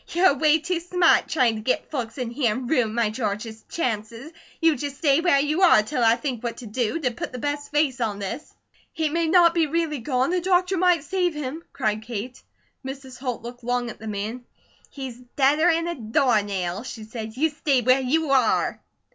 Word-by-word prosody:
"You're 355 Hz, +1 st, +4 dB
away 300 Hz, +3 st, +3 dB
too 335 Hz, +2 st, -2 dB
smart, 350 Hz, 0 st, +3 dB
trying 255 Hz, -7 st, +2 dB
to -, -, -6 dB
get 255 Hz, +4 st, -1 dB
folks 245 Hz, -5 st, -4 dB
in 245 Hz, -3 st, -3 dB
here, 240 Hz, -3 st, +1 dB
and 255 Hz, 0 st, -5 dB
ruin 240 Hz, -6 st, +1 dB
my 230 Hz, -3 st, +1 dB
George's 220 Hz, 0 st, -4 dB
chances. 230 Hz, -1 st, -3 dB, 0.3 s
You 325 Hz, -2 st, +4 dB
just 285 Hz, +1 st, -5 dB
stay 285 Hz, -1 st, +3 dB
where 335 Hz, -6 st, +4 dB
you 300 Hz, +5 st, 0 dB
are 335 Hz, -, +6 dB
till 250 Hz, +2 st, -2 dB
I 225 Hz, 0 st, +5 dB
think 255 Hz, -4 st, -4 dB
what 235 Hz, -1 st, -3 dB
to 245 Hz, -, -9 dB
do, 230 Hz, +5 st, -1 dB
to 255 Hz, -4 st, 0 dB
put 235 Hz, -, -6 dB
the 250 Hz, -, -6 dB
best 290 Hz, +3 st, -3 dB
face 290 Hz, -4 st, +1 dB
on 215 Hz, -3 st, -1 dB
this!" 205 Hz, +9 st, -6 dB, 0.4 s
"He 315 Hz, -1 st, 0 dB
may 335 Hz, +2 st, 0 dB
not 340 Hz, 0 st, +5 dB
be 330 Hz, -2 st, +2 dB
really 315 Hz, -2 st, -1 dB
gone! 255 Hz, +4 st, 0 dB
The 360 Hz, 0 st, +1 dB
doctor 365 Hz, +1 st, +2 dB
might 355 Hz, -3 st, +3 dB
save 355 Hz, +1 st, -1 dB
him!" 300 Hz, +3 st, -5 dB
cried 215 Hz, 0 st, -1 dB
Kate. 235 Hz, +2 st, -6 dB, 0.4 s
Mrs. 265 Hz, -1 st, -8 dB
Holt 250 Hz, -3 st, -4 dB
looked 245 Hz, +1 st, -9 dB
long 245 Hz, 0 st, -1 dB
at -, -, -14 dB
the 220 Hz, -, -8 dB
man. 215 Hz, +4 st, -4 dB, 0.5 s
"He's 265 Hz, -4 st, -7 dB, 0.2 s
deader 295 Hz, +5 st, +4 dB
'an 335 Hz, 0 st, +1 dB
a 345 Hz, -, -1 dB
doornail," 210 Hz, -, 0 dB
she 230 Hz, -3 st, -8 dB
said. 220 Hz, +1 st, -7 dB
"You 315 Hz, +3 st, +2 dB
stay 285 Hz, -3 st, +1 dB
where 255 Hz, +3 st, +4 dB
you 295 Hz, +3 st, 0 dB
are!" 255 Hz, -5 st, +2 dB
260 Hz, 205 wpm, -24 LUFS, 230-315 Hz, 0.5 s, are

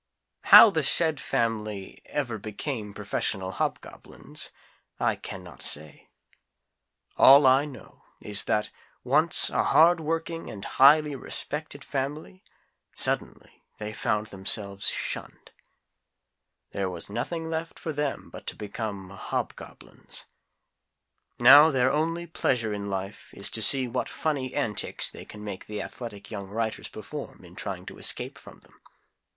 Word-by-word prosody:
How 225 Hz, -, +10 dB
the 160 Hz, -, +1 dB
SAID 160 Hz, +1 st, +4 dB
family 105 Hz, -4 st, -3 dB
ever 120 Hz, -7 st, -3 dB
became 110 Hz, +1 st, -5 dB
professional 100 Hz, -2 st, -2 dB
Hobgoblins, -, -, -5 dB, 0.5 s
I -, -, +1 dB
can 95 Hz, -, -8 dB
not 85 Hz, -6 st, -13 dB
say. 75 Hz, 0 st, -2 dB, 1.1 s
All 140 Hz, +1 st, +8 dB
I 130 Hz, +2 st, +5 dB
know 130 Hz, -9 st, -12 dB, 0.2 s
is 105 Hz, -1 st, +3 dB
that, 105 Hz, 0 st, 0 dB, 0.3 s
once 155 Hz, +6 st, +5 dB
a -, -, +1 dB
hardworking 165 Hz, 0 st, +2 dB
and 100 Hz, -2 st, -8 dB
highly 145 Hz, +2 st, +5 dB
respected 145 Hz, +2 st, -3 dB
family, 145 Hz, +7 st, -5 dB, 0.5 s
suddenly -, -, -3 dB, 0.2 s
they 105 Hz, 0 st, -6 dB
found 105 Hz, 0 st, -1 dB
themselves 100 Hz, 0 st, 0 dB
shunned. -, -, -5 dB, 1.2 s
There 95 Hz, -1 st, -2 dB
was 85 Hz, -2 st, -4 dB
nothing 160 Hz, +10 st, -4 dB
left 165 Hz, 0 st, -4 dB
for 160 Hz, -, -5 dB
them 145 Hz, -1 st, -3 dB
but -, -, -11 dB
to -, -, -3 dB
become 100 Hz, -2 st, -6 dB
HOBGOBLINS. 100 Hz, -, -5 dB, 1.1 s
Now 145 Hz, +6 st, +9 dB
their 130 Hz, -3 st, +2 dB
only 165 Hz, +3 st, -1 dB
pleasure 120 Hz, -9 st, -1 dB
in 100 Hz, 0 st, -5 dB
life 95 Hz, +1 st, -6 dB
is 100 Hz, -, +2 dB
to 110 Hz, -, -2 dB
see 130 Hz, +3 st, +2 dB
what 125 Hz, +1 st, -3 dB
funny 135 Hz, -5 st, -2 dB
antics 115 Hz, -8 st, -1 dB
they -, -, -11 dB
can 105 Hz, 0 st, -11 dB
make 100 Hz, -3 st, -7 dB
the 105 Hz, -1 st, -5 dB
athletic 105 Hz, 0 st, -8 dB
young 100 Hz, -3 st, -6 dB
writers 110 Hz, +1 st, -3 dB
perform -, -, -9 dB
in -, -, -15 dB
trying -, -, -5 dB
to -, -, -10 dB
escape -, -, -2 dB
from -, -, -13 dB
them. -, -, -24 dB
120 Hz, 135 wpm, -26 LUFS, 105-150 Hz, 1.2 s, How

